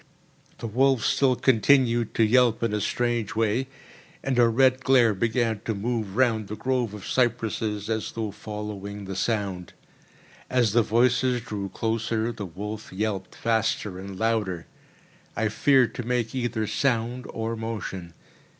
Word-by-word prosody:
The - - -7
wolf 130 +2 +2
still 130 -2 +3
continued 120 -1 +3
to 115 - +4
yelp 120 0 +3
in 115 -2 0
a 105 - 0
strange 120 0 -1
way, 115 +4 +1 0.6
and 130 -2 0
a 120 - +6
red 130 +2 +3
glare 125 -4 +5
began 115 +1 0
to 110 - -1
move 110 -1 -2
round 115 -4 +2
the 105 - -5
grove 125 -3 -1
of 105 - -9
cypresses, 110 -4 0
as 110 -1 -2
though 110 -2 -3
following 105 -1 -6
the 95 0 -5
sound. 95 -4 -2 0.8
As 125 -4 +2
the 120 - +5
voices 125 +2 +2
drew 105 -4 -5
closer, 115 +1 -1
the 105 -4 -6
wolf 105 +5 -7
yelped 95 0 -3
faster 110 -4 -1
and 95 0 -8
louder. 105 -6 0 0.7
I 110 -2 0
feared 130 +2 +3
to 125 - -5
make 120 0 -1
either 120 -4 -1
sound 125 +1 -1
or 115 +1 -3
motion. 105 -6 -5
115 Hz, 150 wpm, -26 LUFS, 105-120 Hz, 0.8 s, a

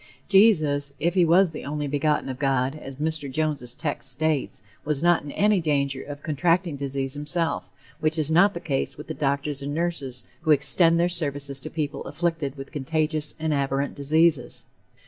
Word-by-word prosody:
Jesus, 155 -9 +4
if 170 +3 +1
he 185 -2 +4
was 175 +2 +4
"the 155 - -7
only 150 +1 -3
begotten 150 +1 0
of 130 -1 -5
God," 135 -1 +1
as 135 -3 -9
Mr. 155 -1 -2
Jones' 140 -4 -2
text 145 -4 -2
states, 150 -3 -1 0.2
was 150 0 -1
not 175 -1 +4
in 145 - -9
any 210 -1 +3
danger 140 -3 0
of 145 0 -9
contracting 165 +2 +1
disease 135 -1 -3
himself, 160 +3 -2 0.3
which 155 0 0
is 155 -1 +1
not 190 +4 +5
the - - -3
case 145 -6 -2
with 150 - -8
the 160 - -5
doctors 140 -1 -1
and 145 +1 -4
nurses 150 -7 -2 0.2
who 160 - -4
extend 165 +3 +4
their 175 - +3
services 145 -5 0
to - - -7
people 150 -3 -3
afflicted 165 -5 -2
with 135 0 -8
contagious 155 +1 -1
and 160 -1 -1
abhorrent 140 0 -1
diseases. 145 -2 +2
150 Hz, 180 wpm, -25 LUFS, 140-165 Hz, 0.3 s, not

